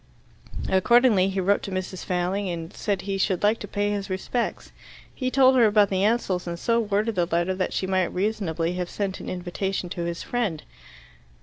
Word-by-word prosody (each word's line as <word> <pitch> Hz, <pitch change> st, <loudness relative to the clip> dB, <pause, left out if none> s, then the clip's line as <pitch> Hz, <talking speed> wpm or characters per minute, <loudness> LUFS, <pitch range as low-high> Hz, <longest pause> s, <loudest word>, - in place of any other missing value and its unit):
Accordingly 200 Hz, 0 st, +4 dB
he 195 Hz, 0 st, -2 dB
wrote 200 Hz, +2 st, +2 dB
to -, -, -6 dB
Mrs. 185 Hz, -1 st, -4 dB
Failing, 185 Hz, +2 st, -1 dB
and 165 Hz, 0 st, -5 dB
said 200 Hz, -3 st, -2 dB
he 195 Hz, 0 st, -2 dB
should 190 Hz, -1 st, 0 dB
like 215 Hz, +2 st, +3 dB
to -, -, -7 dB
pay 205 Hz, 0 st, -1 dB
his 200 Hz, -1 st, -3 dB
respects. 190 Hz, +6 st, -3 dB, 0.4 s
He 255 Hz, -1 st, -2 dB
told 260 Hz, 0 st, +5 dB
her 240 Hz, -3 st, +6 dB
about 205 Hz, -1 st, +4 dB
the 190 Hz, 0 st, +1 dB
Ansells, 200 Hz, -5 st, +1 dB
and 170 Hz, 0 st, -3 dB
so 230 Hz, +6 st, +1 dB
worded 215 Hz, +1 st, 0 dB
the 175 Hz, -3 st, 0 dB
letter 170 Hz, +2 st, 0 dB
that 185 Hz, 0 st, -2 dB
she -, -, -1 dB
might 190 Hz, -1 st, +1 dB
reasonably 180 Hz, -4 st, -1 dB
have 180 Hz, -1 st, -3 dB
sent 195 Hz, -2 st, -3 dB
an -, -, -7 dB
invitation 185 Hz, +1 st, -3 dB
to 175 Hz, -, -5 dB
his 170 Hz, 0 st, -4 dB
friend. 215 Hz, -11 st, -2 dB
190 Hz, 195 wpm, -25 LUFS, 180-210 Hz, 0.4 s, her